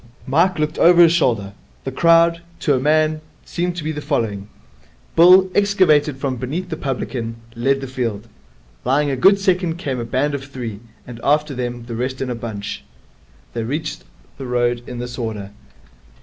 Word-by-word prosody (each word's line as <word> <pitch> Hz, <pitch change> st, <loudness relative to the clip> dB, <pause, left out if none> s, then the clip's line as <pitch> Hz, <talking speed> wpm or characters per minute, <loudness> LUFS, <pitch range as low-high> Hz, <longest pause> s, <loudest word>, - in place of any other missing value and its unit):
Mike 170 Hz, +7 st, +2 dB
looked 155 Hz, 0 st, -2 dB
over 175 Hz, +1 st, +6 dB
his 165 Hz, -1 st, +5 dB
shoulder. 115 Hz, -, +1 dB, 0.3 s
The 135 Hz, -, -4 dB
crowd, 170 Hz, +3 st, +4 dB, 0.2 s
to 145 Hz, -, +2 dB
a 130 Hz, -, +2 dB
man, 155 Hz, +2 st, +2 dB, 0.2 s
seemed 175 Hz, 0 st, -2 dB
to 170 Hz, -, -5 dB
be 155 Hz, +1 st, -2 dB
following. 115 Hz, -9 st, -2 dB, 0.7 s
Bill, 185 Hz, +3 st, +7 dB
excavated 175 Hz, -9 st, +3 dB
from 135 Hz, -2 st, -2 dB
beneath 155 Hz, +9 st, -4 dB
the 160 Hz, -, -3 dB
publican, 125 Hz, -5 st, -4 dB, 0.2 s
led 135 Hz, +3 st, +1 dB
the 135 Hz, -, -5 dB
field. 115 Hz, -4 st, -3 dB, 0.6 s
Lying 140 Hz, +3 st, +1 dB
a -, -, 0 dB
good 195 Hz, +10 st, +5 dB
second 180 Hz, -4 st, 0 dB
came 135 Hz, -7 st, -3 dB
a -, -, -2 dB
band 130 Hz, +5 st, -1 dB
of 135 Hz, -1 st, -4 dB
three, 120 Hz, -6 st, -6 dB, 0.3 s
and 120 Hz, -2 st, -9 dB
after 150 Hz, 0 st, +2 dB
them 120 Hz, -2 st, -4 dB
the 120 Hz, -, -7 dB
rest 130 Hz, +2 st, -3 dB
in 130 Hz, -2 st, -3 dB
a -, -, -1 dB
bunch. 110 Hz, -4 st, -6 dB, 0.7 s
They 115 Hz, -, -3 dB
reached 150 Hz, +7 st, -4 dB, 0.4 s
the 135 Hz, -, -5 dB
road 120 Hz, -1 st, 0 dB
in 125 Hz, -, -6 dB
this 120 Hz, +1 st, -6 dB
order. 105 Hz, -4 st, -4 dB
135 Hz, 175 wpm, -20 LUFS, 120-160 Hz, 0.7 s, Bill